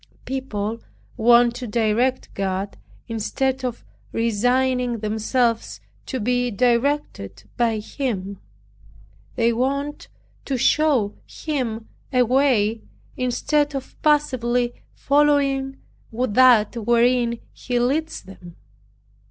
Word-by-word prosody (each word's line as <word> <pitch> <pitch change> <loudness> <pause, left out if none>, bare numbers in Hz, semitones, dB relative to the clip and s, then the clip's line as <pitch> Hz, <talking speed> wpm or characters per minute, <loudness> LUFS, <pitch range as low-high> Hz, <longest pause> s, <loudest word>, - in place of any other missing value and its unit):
People 230 -5 -3 0.4
want 240 0 +5
to 245 -1 -6
direct 235 +4 0
God 195 0 -3 0.3
instead 260 +4 -2
of 245 -2 -4 0.3
resigning 245 +2 +1
themselves 225 +2 -1 0.3
to 260 - -3
be 245 +2 0
directed 235 - 0
by 230 -2 +1
Him. 210 -4 -4 1.0
They 230 0 +2
want 280 +4 -2 0.4
to 270 - -1
show 265 -5 +2
Him 240 -8 -4 0.2
a 250 -2 +4
way, 235 -4 +2 0.3
instead 285 +4 0
of 270 - -6
passively 250 -5 +1 0.2
following 280 -2 +2 0.3
that 240 -1 +4
wherein 235 +1 +2
He 245 -1 -3
leads 295 +7 -1
them. 180 -3 -13
245 Hz, 95 wpm, -22 LUFS, 225-265 Hz, 1.0 s, want